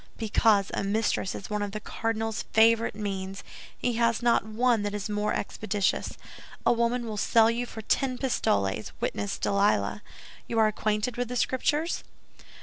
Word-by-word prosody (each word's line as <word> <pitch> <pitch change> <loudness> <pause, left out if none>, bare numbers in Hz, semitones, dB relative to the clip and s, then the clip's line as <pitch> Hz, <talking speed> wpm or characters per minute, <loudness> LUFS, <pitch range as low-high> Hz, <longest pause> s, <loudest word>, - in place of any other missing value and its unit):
"Because 215 -2 +2
a - - -1
mistress 200 -1 0
is 200 - -8
one 210 0 -1
of 205 -1 -3
the 215 - -3
cardinal's 225 0 -2
favorite 225 0 +4
means; 195 -2 -4 0.3
he 240 -2 -1
has 230 0 +2
not 235 -4 +4
one 225 +2 +1
that 205 0 -2
is 205 0 -3
more 210 0 0
expeditious. 205 -1 -1 0.5
A - - +5
woman 235 +1 0
will 215 -2 -5
sell 225 +2 +4
you 240 +1 -2
for 220 - -8
ten 255 +3 0
pistoles, 100 - 0
witness 100 -1 -2
Delilah. 200 +1 +1 0.5
You 230 - -3
are 220 - +5
acquainted 215 +2 -1
with 245 0 -1
the 250 - -5
Scriptures?" 295 +6 0
220 Hz, 160 wpm, -27 LUFS, 205-235 Hz, 0.5 s, A